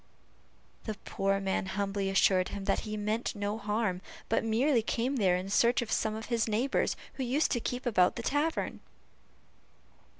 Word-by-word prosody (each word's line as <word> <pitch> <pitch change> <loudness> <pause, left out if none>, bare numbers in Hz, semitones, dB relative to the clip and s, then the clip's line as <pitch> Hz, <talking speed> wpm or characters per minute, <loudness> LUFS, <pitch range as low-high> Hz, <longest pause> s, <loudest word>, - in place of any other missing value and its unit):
The 215 - -3
poor 195 0 0
man 190 -1 -1
humbly 195 0 -1
assured 190 -1 +3
him 200 -1 -6
that - - +2
he 215 - -3
meant 215 +3 -1
no 205 +1 -2
harm, 210 -3 -1 0.3
but 225 - +2
merely 235 +3 +2
came 245 +5 -1
there 190 -5 +3
in 185 +1 -5
search 235 +3 +3
of 220 - -8
some 215 -1 0
of 220 +1 -6
his 235 -2 0
neighbors, 225 +5 +1 0.2
who 265 - -1
used 265 +5 +1
to 240 - +1
keep 245 +2 -4
about 185 -7 +3
the 235 - -5
tavern. 290 +6 -1
220 Hz, 170 wpm, -30 LUFS, 195-240 Hz, 0.3 s, assured